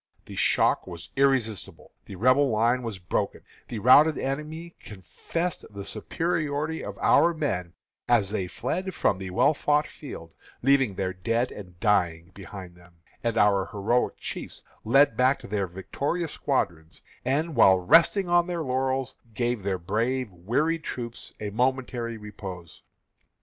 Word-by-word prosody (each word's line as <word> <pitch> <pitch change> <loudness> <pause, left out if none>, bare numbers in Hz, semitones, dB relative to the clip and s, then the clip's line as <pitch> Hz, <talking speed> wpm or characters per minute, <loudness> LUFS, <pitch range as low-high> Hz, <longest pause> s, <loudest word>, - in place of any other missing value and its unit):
The - - -10
shock - - +3
was 85 -2 -9
irresistible; 130 -6 0 0.2
the 100 - -8
Rebel 130 +7 +4
line 115 +3 +2
was 115 -5 -5
broken 90 -1 -2 0.3
the 115 - -5
routed 145 +8 +6
enemy 155 +5 -4
confessed 165 - -5
the 100 -1 -8
superiority 155 +5 -2
of - - -7
our 170 0 +4
men 90 - -2 0.3
as 105 -5 +3
they 95 -4 -2
fled 185 - -3
from 95 - +1
the 95 -1 -5
well 140 +11 +3
fought 150 +1 +1
field, 85 - -10 0.3
leaving 135 -6 +3
their 95 -1 -2
dead 115 +7 -1
and 90 -4 -11
dying 90 -5 +1
behind 95 -2 -9
them; 90 -1 -20 0.3
and 115 -1 0
our 100 -2 +3
heroic 115 +3 0
chiefs - - -7 0.2
led 130 +1 +4
back 130 +3 +2
their 100 -2 -2
victorious 140 - -3
squadrons, 85 - -2 0.2
and, 145 +5 0
while 95 -1 +6
resting 170 - +4
on 175 0 +3
their 170 -2 -2
laurels, 130 0 -1 0.2
gave 120 -2 -1
their 95 -1 -1
brave, 115 +7 -1
wearied 145 - -1
troops 120 -4 -6
a 105 -1 -4
momentary 125 0 -1
repose." 95 -5 -9
120 Hz, 145 wpm, -26 LUFS, 95-140 Hz, 0.3 s, routed